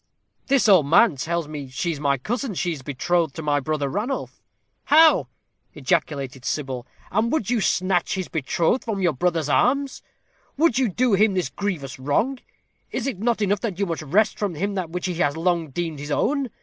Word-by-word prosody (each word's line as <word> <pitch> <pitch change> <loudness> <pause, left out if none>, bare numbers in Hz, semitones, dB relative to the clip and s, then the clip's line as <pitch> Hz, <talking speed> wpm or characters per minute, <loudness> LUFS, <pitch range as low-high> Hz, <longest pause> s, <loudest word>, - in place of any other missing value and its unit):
"This 270 -3 +3
old 185 -8 +6
man 170 +3 +5
tells 165 +4 -2
me 145 -3 -7
she 145 +7 -2
is 150 - -5
my 140 -2 +1
cousin. 235 - -3
She 175 +1 -1
is 145 - -8
betrothed 155 +4 -1
to 160 - -6
my 145 -1 +1
brother 145 0 -2
Ranulph." 210 - -4 0.4
"How?" 315 +2 +6 0.5
ejaculated 135 -3 -1
Sybil. 130 -3 -3 0.2
"And 220 +5 +1
would 245 -8 0
you 240 -3 +2
snatch 185 -1 +1
his 185 -2 -3
betrothed 165 - 0
from 220 -4 -3
your 175 -3 +3
brother's 165 +1 0
arms? 275 - +1 0.6
Would 290 -5 +3
you 255 -4 +2
do 240 +4 +1
him 200 0 +3
this 180 -2 0
grievous 165 -11 -4
wrong? 215 - 0 0.5
Is 255 - -3
it 255 -9 -3
not 225 0 +1
enough 205 0 +1
that 205 -7 -3
you 200 - 0
must 165 -3 -3
wrest 190 +9 +1
from 200 -5 -2
him 200 +6 -2
that 185 -4 -3
which 180 +1 -4
he 180 - -1
has 145 -2 +1
long 170 -2 0
deemed 160 +1 -4
his 145 +1 -7
own? 275 - 0
175 Hz, 195 wpm, -23 LUFS, 150-220 Hz, 0.6 s, old